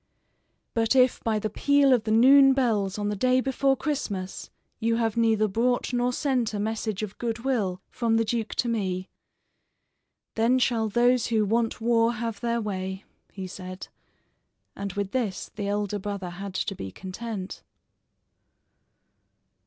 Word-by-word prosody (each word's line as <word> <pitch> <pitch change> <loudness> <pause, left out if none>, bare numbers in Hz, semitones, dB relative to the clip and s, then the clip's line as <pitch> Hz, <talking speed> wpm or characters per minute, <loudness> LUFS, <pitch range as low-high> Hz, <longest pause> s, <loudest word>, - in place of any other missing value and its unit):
"But 225 +2 +1
if 255 -1 +4
by 220 -1 +1
the 215 0 -3
peal 285 +2 +4
of 230 -4 +1
the 215 - -1
noon 270 +4 +7
bells 215 -7 0
on 205 0 -1
the 210 - -1
day 255 +5 +3
before 270 +1 +1
Christmas 200 -12 -3 0.3
you 230 +1 +1
have 225 -2 0
neither 225 -2 +3
brought 245 +5 0
nor 245 0 +1
sent 250 -5 0
a - - -2
message 215 -1 -2
of 205 -2 -7
good 230 -1 -3
will 195 -9 -1
from 230 -2 +1
the 225 - +2
duke 225 0 -2
to 245 - 0
me, 190 -5 -2 1.2
then 230 +3 +3
shall 230 -3 +1
those 245 +2 +3
who 220 -2 +2
want 225 +2 0
war 230 0 +2
have 230 -2 -4
their 235 -1 0
way," 190 -2 -4 0.3
he 190 -2 -6
said, 185 0 -8 0.9
and 200 -1 -5
with 200 -1 -3
this 225 -8 -2
the 205 -1 -4
elder 205 0 -1
brother 195 -2 -5
had 190 +2 -7
to - - -1
be 95 - -7
content. 190 - -6
225 Hz, 155 wpm, -26 LUFS, 200-240 Hz, 1.2 s, noon